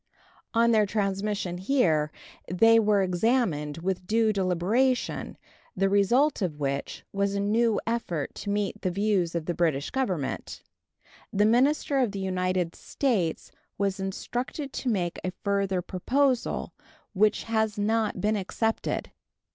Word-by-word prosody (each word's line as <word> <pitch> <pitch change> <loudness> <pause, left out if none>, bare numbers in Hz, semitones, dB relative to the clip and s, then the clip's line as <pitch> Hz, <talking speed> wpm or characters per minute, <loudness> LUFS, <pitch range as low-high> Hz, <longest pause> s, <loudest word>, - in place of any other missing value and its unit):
On 235 +1 +4
their 215 -2 +4
transmission 195 -3 -1
here 170 - +2 0.4
they 225 +5 +6
were 210 -2 +3
examined 180 - 0
with 180 +1 -3
due 220 0 +3
deliberation, 200 +8 0 0.4
the 195 +1 +2
result 235 +9 +3
of 160 -6 -2
which 140 -1 -3
was 200 0 0
a - - 0
new 220 +2 +2
effort 200 -10 -2
to 205 - -6
meet 205 0 -1
the 185 - 0
views 190 -3 0
of 165 -2 -2
the 175 - -1
British 155 -5 0
Government. 185 - -3 0.7
The 205 +1 +3
minister 270 +5 +3
of 240 -6 +1
the 200 - -4
United 185 -2 -1
States 210 - -1 0.3
was 195 0 -1
instructed 245 +8 -4
to 255 - -2
make 180 -6 -1
a 185 - -3
further 195 -2 0
proposal, 255 +8 0 0.4
which 210 +2 +2
has 220 -2 0
not 215 +1 0
been 215 +1 +1
accepted. 220 +3 -2
200 Hz, 135 wpm, -27 LUFS, 180-225 Hz, 0.7 s, they